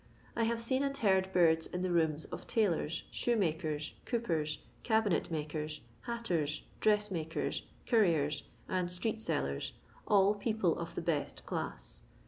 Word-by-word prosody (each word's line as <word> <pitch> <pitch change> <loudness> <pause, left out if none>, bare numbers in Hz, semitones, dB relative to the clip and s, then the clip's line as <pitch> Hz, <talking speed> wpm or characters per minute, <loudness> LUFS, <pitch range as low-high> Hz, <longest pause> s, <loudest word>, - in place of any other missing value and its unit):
I 230 - +2
have 230 0 +1
seen 260 +3 +1
and 275 0 0
heard 190 -6 +3
birds 165 -3 +4
in 180 0 -3
the 185 - 0
rooms 160 -2 +2
of - - -6
tailors, 170 -7 +1
shoemakers, 160 -9 0
coopers, 165 -11 0 0.2
cabinet 220 -5 +2
makers, 155 -1 -3 0.3
hatters, 175 -11 -1 0.2
dressmakers, 205 -7 +1 0.2
curriers, 165 - +3 0.2
and 180 -1 0
street 220 +5 -1
sellers, 70 - -1 0.2
— - - -26
all 200 -1 +5
people 210 -4 +1
of 170 0 -5
the - - -1
best 160 -4 -1
class. - - -4
180 Hz, 135 wpm, -33 LUFS, 160-220 Hz, 0.3 s, all